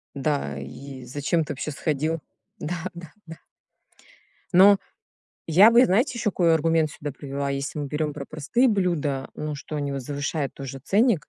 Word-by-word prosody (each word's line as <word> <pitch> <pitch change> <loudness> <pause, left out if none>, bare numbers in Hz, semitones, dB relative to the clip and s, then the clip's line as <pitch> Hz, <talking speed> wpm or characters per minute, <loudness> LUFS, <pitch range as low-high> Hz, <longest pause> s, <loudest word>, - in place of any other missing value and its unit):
Да 140 - -1
и 130 - -9
зачем 145 +6 0
ты 150 - -5
вообще 150 +3 -4
сходил? 155 +2 -1 0.4
Да, 170 +1 -4
да, 170 -3 -10
да. 165 -1 -10 1.2
Но 195 +2 +8 0.7
я 185 +8 +7
бы, 240 +2 +7
знаете, 235 +5 +2
ещё 225 -3 +1
какой 170 -4 +3
аргумент 160 -1 +2
сюда 145 -1 -6
привела, 140 0 -4
если 140 +2 -3
мы 145 - -2
берём 150 +1 -2
про 140 -1 -6
простые 165 - +1
блюда, 165 -10 0
ну, 150 0 -4
что 150 +2 -6
они 145 -1 -2
вот 135 -1 -4
завышают 145 +1 -3
тоже 135 -1 -7
ценник. 205 - +2
150 Hz, 165 wpm, -25 LUFS, 140-170 Hz, 1.2 s, Но